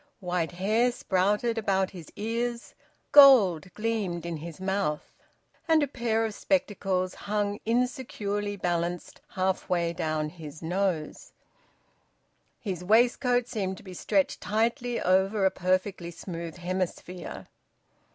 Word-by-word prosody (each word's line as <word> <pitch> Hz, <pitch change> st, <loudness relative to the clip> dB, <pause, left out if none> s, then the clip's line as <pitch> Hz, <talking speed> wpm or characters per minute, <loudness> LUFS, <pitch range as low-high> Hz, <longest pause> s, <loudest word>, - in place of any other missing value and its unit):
White 180 Hz, -3 st, -2 dB
hair 215 Hz, +7 st, +2 dB
sprouted 210 Hz, +3 st, 0 dB
about 195 Hz, -3 st, +1 dB
his 175 Hz, -5 st, -11 dB
ears; 235 Hz, +2 st, -3 dB, 0.4 s
gold 215 Hz, -, +7 dB
gleamed 210 Hz, -6 st, -2 dB
in 170 Hz, -1 st, -3 dB
his 165 Hz, +2 st, -8 dB
mouth; 190 Hz, -5 st, -2 dB, 0.5 s
and 320 Hz, -2 st, +4 dB
a -, -, 0 dB
pair 230 Hz, -4 st, 0 dB
of 220 Hz, -, -3 dB
spectacles 195 Hz, -8 st, 0 dB
hung 205 Hz, 0 st, -2 dB
insecurely 220 Hz, -4 st, -1 dB
balanced 175 Hz, -2 st, -2 dB
half 190 Hz, 0 st, -1 dB
way 170 Hz, -2 st, +1 dB
down 155 Hz, -3 st, -1 dB
his 155 Hz, -2 st, -10 dB
nose; 175 Hz, -2 st, -2 dB, 1.3 s
his 185 Hz, -5 st, -4 dB
waistcoat 245 Hz, +4 st, +3 dB
seemed 190 Hz, -5 st, -3 dB
to -, -, -13 dB
be 185 Hz, -2 st, -9 dB
stretched 195 Hz, +2 st, 0 dB
tightly 235 Hz, +4 st, 0 dB
over 190 Hz, +2 st, +2 dB
a 190 Hz, -, +4 dB
perfectly 185 Hz, -1 st, -1 dB
smooth 170 Hz, -1 st, -7 dB
hemisphere. 180 Hz, 0 st, -4 dB
190 Hz, 120 wpm, -28 LUFS, 180-225 Hz, 1.3 s, gold